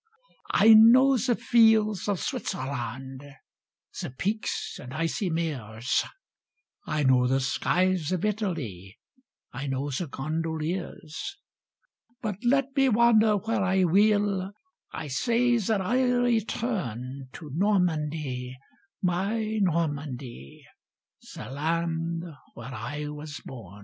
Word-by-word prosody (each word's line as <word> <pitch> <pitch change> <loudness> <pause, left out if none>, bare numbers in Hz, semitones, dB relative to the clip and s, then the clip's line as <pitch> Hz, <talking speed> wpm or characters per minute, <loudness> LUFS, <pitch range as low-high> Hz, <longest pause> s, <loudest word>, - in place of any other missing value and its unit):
174! 210 - +4
I - - +10
know 265 +3 +6
the 245 0 +1
fields 220 -4 +3
of 200 -3 0
Switzerland, 130 0 -4 0.8
The - - -4
peaks 205 - -3
and 125 +1 -9
icy 165 +5 -1
meres; 130 -8 -1 0.8
I 150 -1 0
know 130 -2 +4
the 135 +1 +2
skies 180 +5 +1
of 185 +1 0
Italy, 150 - -3 0.6
I 135 +3 -5
know 135 +2 -2
the 160 +6 -3
gondoliers; 160 - -4 0.8
But 210 -5 -3
let 270 +2 +2
me 270 -1 +4
wander 220 -2 +4
where 220 +1 -1
I 190 0 +2
will, 200 +1 +2 0.4
I 160 - -5
say 235 - +2
that 210 -1 0
I'll 245 +4 +2
return 160 - -2
To 150 -3 -9
Normandy, 155 -9 0 0.5
my 215 +5 0
Normandy, 145 - -3 0.7
The - - -7
land 165 +3 -1 0.3
where 120 +3 -8
I 145 +7 -5
was 150 0 -7
bom. 105 -6 -10
170 Hz, 110 wpm, -27 LUFS, 135-215 Hz, 0.8 s, I